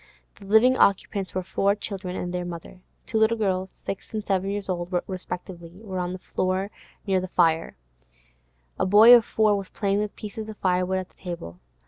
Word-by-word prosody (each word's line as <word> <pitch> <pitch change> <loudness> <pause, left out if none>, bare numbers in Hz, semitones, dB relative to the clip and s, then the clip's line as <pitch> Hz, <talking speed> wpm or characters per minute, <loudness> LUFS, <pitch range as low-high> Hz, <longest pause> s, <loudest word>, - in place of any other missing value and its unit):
The 200 - -12
living 225 +6 +5
occupants 195 -1 +1
were 185 - -1
four 200 +2 +1
children 190 -3 -5
and 180 -1 -4
their 180 0 -2
mother. 175 +1 -8 0.2
Two 220 - 0
little 220 +1 +3
girls, 190 -3 0 0.2
six 195 - -5
and 215 -1 -3
seven 195 0 0
years 200 -1 -3
old 175 -1 -3
respectively, 180 -1 -7
were 190 -4 -4
on 180 0 -2
the 185 - -5
floor 185 +2 -2 0.3
near 190 -3 +1
the 185 - -4
fire; 165 - +1 1.0
a - - +2
boy 215 +5 +9
of 240 -2 +8
four 215 -1 +2
was 195 -1 -5
playing 200 -1 0
with 210 -1 -3
pieces 215 +1 -7
of 215 - -8
firewood 185 0 +1
at 185 -1 -5
the - - -32
table. 170 - -7
190 Hz, 190 wpm, -25 LUFS, 180-205 Hz, 1.0 s, boy